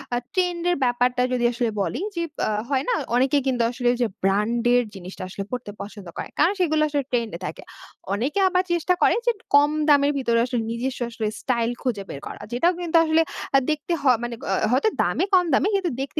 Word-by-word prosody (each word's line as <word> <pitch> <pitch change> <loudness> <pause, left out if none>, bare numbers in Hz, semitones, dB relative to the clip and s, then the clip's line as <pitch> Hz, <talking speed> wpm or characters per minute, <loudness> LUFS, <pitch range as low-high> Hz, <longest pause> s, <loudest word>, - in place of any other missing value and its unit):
আ - - +1 0.2
trend 355 -2 0
এর 355 - +2
ব্যাপারটা 245 0 +1
যদি 245 -1 0
আসলে 240 0 -1
বলি, - - -2 0.2
যে 340 - -1 0.3
আ - - 0 0.2
হয় 270 -2 +1
না? - - +3 0.2
অনেকে 270 +3 +3
কিন্তু 245 -3 +1
আসলে 245 -1 0
যে 235 - +3 0.2
ব্র্যান্ড 210 +5 +1
এর 245 - +4
জিনিসটা 185 0 -8
আসলে 195 +1 -5
পড়তে 250 -4 -4
পছন্দ 205 -3 -9
করে। - - -5
কারণ 375 - +4
সেগুলো 315 -3 +2
আসলে 285 -2 0
ট্রেন্ড 235 -3 0
এ - - -25
থাকে। 155 - -6 0.5
অনেকে 265 - -1
আবার 365 0 +2
চেষ্টা 345 +1 +2
করে - - +5
যে - - +6 0.2
কম 290 +1 +6 0.2
দামের 285 0 +5
ভেতরে 235 -3 +1
আসলে 245 -2 -2
নিজস্ব 255 +3 -3
আসলে 225 -2 -3
স্টাইল 235 -3 0
খুঁজে 225 -6 -1
বের 140 - -6
করা। - - -9
যেটাও 335 +10 +2
কিন্তু 335 -1 +2
আসলে 320 +1 +3 0.3
আ - - +9
দেখতে 305 +3 -2
হ - - -13 0.2
মানে 240 -1 -3
গ - - -6 0.3
হয়তো 270 - +3
দামে - - +1
কম 360 -1 +5
দামি 350 - +3
কিন্তু 375 -5 0
দেখতে 280 +3 -3
255 Hz, 210 wpm, -23 LUFS, 235-315 Hz, 0.5 s, আ